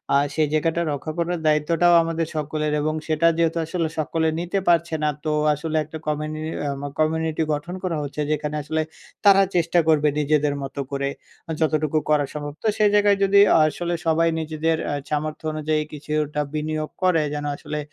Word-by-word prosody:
আর 140 +1 +4
সেই 155 -1 +2
জায়গাটা 165 +2 +1
রক্ষা 145 +2 -4
করার 170 0 -1
দায়িত্বটাও 165 +3 +3
আমাদের 165 -1 -2
সকলের 150 0 -2
এবং 155 +1 0
সেটা 160 +1 +2
যেহেতু 165 0 +1
আসলে 165 0 -1
সকলে 160 +1 0
নিতে 175 +3 -1
পারছে 170 -1 +3
না 150 - +3 0.2
তো 155 - +1 0.2
আসলে 155 +2 -2
একটা 160 +2 -8
কমিউনি 155 +1 -2 0.3
আ - - 0 0.3
কমিউনিটি 160 0 +1
গঠন 170 +5 -4
করা 170 -4 -1
হচ্ছে 145 +1 -4
যেখানে 150 0 -2
আসলে 160 +2 -1 0.4
তারা 195 -1 +7
চেষ্টা 170 0 +3
করবে 155 -1 +4
নিজেদের 150 0 +2
মতো 135 +1 -6
করে 140 0 -1 0.5
যতটুকু 155 -1 +1
করা 150 -2 +3
সম্ভব 145 -1 -5
তো - - +1
সেই 210 -1 +4
জায়গায় 205 -1 +4
যদি 200 +1 +5 0.3
আসলে 175 +3 -2
সবাই 165 +1 +3
নিজেদের 160 +1 -1
আ - - -1 0.2
সামর্থ্য 155 +1 -3
অনুযায়ী 155 0 0
কিছুটা 150 0 -2
বিনিয়োগ 155 0 -2
করে 180 -3 +4
যেন 145 0 -3
আসলে 150 - -5
155 Hz, 170 wpm, -23 LUFS, 150-165 Hz, 0.5 s, তারা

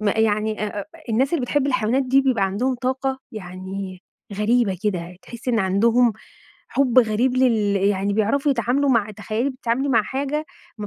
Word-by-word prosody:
ما 210 -2 +1
يعني 215 -1 +1
أ 205 0 -4
أ - - -6 0.2
الناس 260 +7 +1
اللي 320 - +1
بتحب 275 +3 0
الحيوانات 255 -1 +1
دي 265 +1 +3
بيبقى 255 -7 +1
عندهم 230 +7 0
طاقة 265 +2 -2
يعني 185 -1 -7 0.3
غريبة 210 -2 +1
كده، 180 -4 -2
تحسي 240 +1 -5
إن 230 - +1
عندهم 225 +5 +3 0.6
حُب 260 -3 +2
غريب 240 +2 +2
لل 220 -6 +2
يعني 200 0 +1
بيعرفوا 225 +8 +1
يتعاملوا 265 +3 +1
مع 215 -4 +2
تخيلي 215 +5 -2
بتتعاملي 260 +1 -2
مع 230 -5 +3
حاجة 280 +5 -3 0.3
ما 210 - -4
230 Hz, 165 wpm, -22 LUFS, 205-260 Hz, 0.6 s, دي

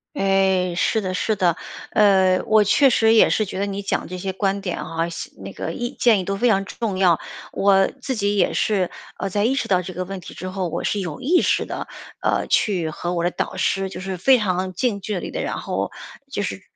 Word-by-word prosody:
诶， 190 -2 +2
是 220 +5 +1
的 185 -3 -3
是 210 +3 0
的。 175 -4 +2 0.4
呃， 190 -3 +4
我 215 -1 +4
确 270 +7 +5
实 225 -2 +4
也 225 - +6
是 215 - +1
觉 190 - -6
得 200 - +1
你 200 0 -4
讲 195 - -2
这 185 - -5
些 190 +1 -4
观 195 0 0
点 185 -3 -4
啊， 165 +1 -2
系 170 - -7
那 - - -9
个 - - -4
意 240 -1 -4
建 225 -5 +4
议 185 - -4
都 195 +1 -1
非 240 +4 +2
常 195 -2 +2
重 205 -2 -3
要。 180 -4 +4 0.4
我 195 -1 +4
自 265 - -2
己 205 -3 0
也 195 - +2
是， 195 -4 +1 0.3
呃， 195 - -3
在 205 +3 0
意 265 +3 +2
识 275 - -2
到 185 -1 +3
这 185 +1 -7
个 185 - -3
问 190 +1 -6
题 175 - -11
之 185 - -6
后， 185 -1 -2
我 - - -4
是 205 - 0
有 170 -6 -5
意 345 +7 +3
识 - - +1
地， - - -5 0.3
呃， - - +1
去 180 -7 +1
和 175 +3 -4
我 170 -1 -1
的 175 - +1
导 - - -3
师 195 0 0
就 185 -1 -7
是 190 -1 -4
非 260 +8 +5
常 185 -3 -1
近 205 +1 0
距 205 -1 -3
离 - - -6
地 - - -4
然 - - -3
后 - - -3 0.4
就 205 -6 -2
是 190 - -4
195 Hz, 260 characters per minute, -22 LUFS, 185-210 Hz, 0.4 s, 也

